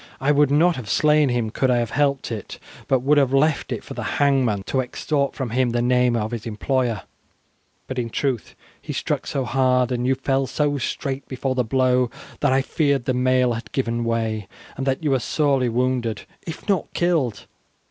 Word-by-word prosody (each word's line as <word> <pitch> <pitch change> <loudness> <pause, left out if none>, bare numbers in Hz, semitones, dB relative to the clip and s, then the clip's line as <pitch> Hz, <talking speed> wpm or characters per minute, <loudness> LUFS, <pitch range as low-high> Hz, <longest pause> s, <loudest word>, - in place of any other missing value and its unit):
"I 135 +2 +2
would 145 -1 +4
not 165 +5 +3
have 115 -6 -7
slain 150 +1 +4
him 120 -3 -1
could 130 +3 +1
I 125 - +3
have 120 -2 -1
helped 140 -3 0
it, 110 -3 -6 0.3
but 130 -2 +2
would 145 +2 +4
have 135 -1 +2
left 150 +2 +2
it - - -3
for - - -8
the - - -5 0.2
hangman 130 -8 +2
to 130 +6 0
extort 140 +2 -2
from 130 -5 -4
him 125 +1 +2
the 120 0 0
name 125 -1 +3
of 110 -1 -1
his 115 -1 -5
employer; 115 -1 -1 0.8
but, 130 -1 -4
in 115 -1 -2
truth, 130 -1 -2 0.3
he - - -6
struck - - -2
so 135 -2 -1
hard, 125 -1 +2
and 125 0 -1
you 135 - +3
fell 135 0 0
so 145 0 0
straight 135 +2 -3
before 130 0 -2
the 130 -1 +1
blow, 125 +1 +2 0.3
that 145 - +2
I 135 0 +3
feared 140 -5 0
the 130 - +1
mail 125 -1 +2
had 115 -2 -7
given 120 -3 -1
way, 110 -3 -1 0.3
and 135 +1 -4
that 135 +4 0
you 150 - +1
were 135 - +3
sorely 135 -2 +1
wounded 120 -2 -1 0.2
if 160 - -7
not 195 -3 0
killed. 155 -12 0
130 Hz, 200 wpm, -22 LUFS, 120-140 Hz, 0.8 s, would